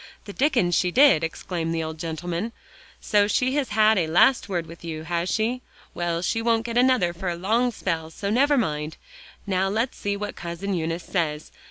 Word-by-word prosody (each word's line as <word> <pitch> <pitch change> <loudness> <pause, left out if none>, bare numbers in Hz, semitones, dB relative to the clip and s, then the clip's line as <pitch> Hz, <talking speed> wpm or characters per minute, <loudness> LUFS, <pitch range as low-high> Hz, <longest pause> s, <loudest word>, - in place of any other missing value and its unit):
"The 200 - -8
Dickens 245 - +2
she 180 +1 +2
did," 205 - +5
exclaimed 165 0 -3
the 165 - -1
old 160 0 -6
gentleman; 170 +6 -4 0.5
"so 205 -1 +2
she 250 +5 +1
has 280 -3 0
had 215 -1 +4
a 165 - 0
last 200 +9 +4
word 175 -3 -1
with 165 +1 -12
you, 160 -2 -5
has 170 +2 -2
she? 230 +5 0 0.3
Well, 170 0 -2
she 225 +4 0
won't 230 -1 +1
get 235 -1 -4
another 245 -8 +3
for 175 +1 -4
a 170 - -2
long 225 +8 +1
spell; 165 -7 -3
so 200 +5 -4
never 280 +5 +3
mind. 150 - -2 0.5
Now, 190 -1 0
let's 225 +5 -1
see 205 0 -2
what 205 0 -5
Cousin 175 +4 -4
Eunice 165 0 -2
says. 155 -4 -2
185 Hz, 195 wpm, -24 LUFS, 165-225 Hz, 0.5 s, did